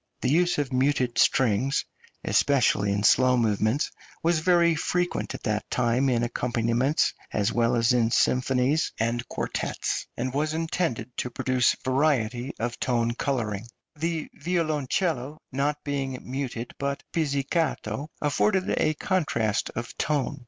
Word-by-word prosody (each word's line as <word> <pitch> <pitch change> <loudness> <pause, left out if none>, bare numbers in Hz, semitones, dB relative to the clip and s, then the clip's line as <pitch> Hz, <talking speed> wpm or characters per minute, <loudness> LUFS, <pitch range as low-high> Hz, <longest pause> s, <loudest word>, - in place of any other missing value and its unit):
The 130 - +1
use 175 +3 +3
of 140 -3 -2
muted 130 -2 +1
strings, 130 +2 +2 0.4
especially 115 -7 +2
in 100 0 0
slow 125 +3 +5
movements, 110 +3 +1 0.3
was 165 0 +3
very 170 0 +4
frequent 175 +3 -1
at - - -9
that 110 -2 -2
time 125 +2 +1
in 120 -2 +1
accompaniments, 120 +4 +1 0.2
as 105 -2 0
well 120 0 +2
as 115 +1 +3
in 115 -2 +3
symphonies 130 +4 +2
and 115 +2 -1
quartets, - - -3
and 130 +1 -2
was 155 +2 0
intended 160 -8 -2
to 125 - -2
produce 130 -1 +1
variety 130 -2 +1
of 120 +1 -3
tone 120 -2 +1
colouring; 115 -5 -2 0.3
the 165 +1 -2
violoncello 155 -3 -1
not 140 +3 0
being 135 -2 -2
muted, 125 -2 -4
but 140 0 -2
pizzicato, 150 0 -1
afforded 185 +6 +1
a 155 - +2
contrast 130 - 0
of 120 +1 -5
tone. 145 -1 0
130 Hz, 130 wpm, -26 LUFS, 120-150 Hz, 0.4 s, slow